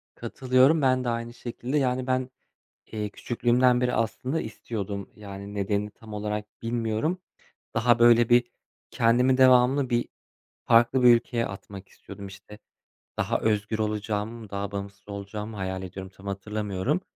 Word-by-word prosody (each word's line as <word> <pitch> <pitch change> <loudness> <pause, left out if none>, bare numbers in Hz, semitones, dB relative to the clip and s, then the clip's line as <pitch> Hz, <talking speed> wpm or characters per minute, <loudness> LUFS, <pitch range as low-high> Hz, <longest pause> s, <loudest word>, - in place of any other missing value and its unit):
Katılıyorum. 130 +4 +3
Ben 130 -1 +3
de 120 - -1
aynı 115 0 -3
şekilde, 125 +3 -4
yani, 130 -2 0
ben, 130 0 0 0.6
eee, 105 -1 -3
küçüklüğümden 120 +3 +2
beri 125 0 +1
aslında 130 +7 -1
istiyordum. 100 -3 -5
Yani 100 -1 -9
nedenini 100 +1 -1
tam 110 +1 -13
olarak 105 0 -3 0.2
bilmiyorum. 115 +9 -1 0.5
Daha 115 +1 +3
böyle 120 -1 +6
bir 120 0 +4 0.4
kendimi 125 +3 +3
devamlı 130 +1 +5
bir 120 -1 +1 0.6
farklı 120 +2 +4
bir 120 -1 +9
ülkeye 115 0 -1
atmak 100 0 -9
istiyordum. 100 - -11
İşte 105 +2 -13 0.6
daha - - +1
özgür 105 0 0
olacağım, 105 +1 -3
daha 100 0 -3
bağımsız 100 0 -7
olacağımı 105 +2 -6
hayal 95 -1 -3
ediyodum. 95 +1 -8
Tam 95 - -14
hatırlamıyorum. 105 - -2
115 Hz, 135 wpm, -26 LUFS, 100-125 Hz, 0.6 s, bir